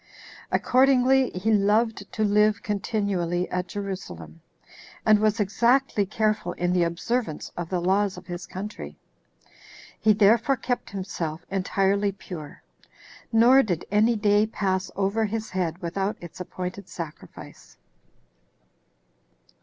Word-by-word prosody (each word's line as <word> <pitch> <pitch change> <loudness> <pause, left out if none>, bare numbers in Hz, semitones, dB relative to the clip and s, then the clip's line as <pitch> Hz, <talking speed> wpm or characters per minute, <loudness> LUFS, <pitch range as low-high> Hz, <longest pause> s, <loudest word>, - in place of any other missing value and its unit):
Accordingly, 260 0 +4
he 190 +5 -1
loved 210 +1 +1
to 215 - 0
live 210 0 +3
continually 195 -4 -1
at 180 0 -2
Jerusalem, 180 - -7 0.6
and 215 -1 +6
was 215 +1 +1
exactly 220 +1 +2
careful 215 -4 0
in 175 0 -1
the 180 - +2
observance 170 +2 -2
of 175 -1 -5
the 180 - 0
laws 190 +2 +1
of - - -10
his 175 -1 -7
country. 205 +3 -7 1.0
He 215 -1 +4
therefore 225 +6 +4
kept 245 +1 -3
himself 170 -4 -5
entirely 195 +1 +1
pure; 180 -6 -10 0.7
nor 245 +4 +6
did 175 -9 -2
any 220 +3 +3
day 210 0 +3
pass 190 -3 -1
over 200 +3 +1
his 215 +1 -4
head 175 -3 -1
without 195 +4 -2
its 175 0 -11
appointed 180 +1 -6
sacrifice. 165 -3 -10
200 Hz, 120 wpm, -25 LUFS, 180-220 Hz, 1.0 s, and